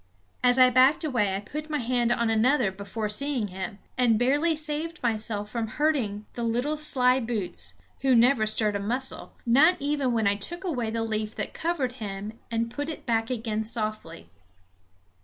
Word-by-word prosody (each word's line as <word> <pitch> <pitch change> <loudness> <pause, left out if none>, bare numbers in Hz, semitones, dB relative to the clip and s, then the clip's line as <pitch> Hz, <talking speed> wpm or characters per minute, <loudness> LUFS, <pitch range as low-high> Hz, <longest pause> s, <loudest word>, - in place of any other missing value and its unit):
As 250 0 +4
I 255 -1 +7
backed 260 +6 +4
away 225 -10 0
I - - -2
put 300 +9 -7
my 300 - 0
hand 240 -2 0
on 235 -2 +1
another 230 -1 +3
before 200 +3 -5
seeing 240 0 0
him, 190 +1 -6 0.2
and 235 -3 +4
barely 290 +7 +2
saved 310 +2 -3
myself 215 -2 -1
from 230 -1 -2
hurting 220 -6 -1
the 240 - -5
little 245 +6 0
sly 260 -4 +3
boots, 225 -6 -4 0.2
who 265 -2 +3
never 235 -1 +4
stirred 215 -1 0
a - - -1
muscle, 245 +6 -1
not 285 +9 +5
even 285 -2 0
when 225 -2 +1
I 200 - +4
took 345 - -2
away 250 -11 -2
the 225 0 -2
leaf 215 -1 -3
that - - -4
covered 320 -7 -1
him 205 +1 -5 0.2
and 230 0 -1
put 290 +4 -4
it 315 - -7
back 225 -1 0
again 220 -3 -2
softly. 215 -7 -4
235 Hz, 175 wpm, -26 LUFS, 215-280 Hz, 0.2 s, I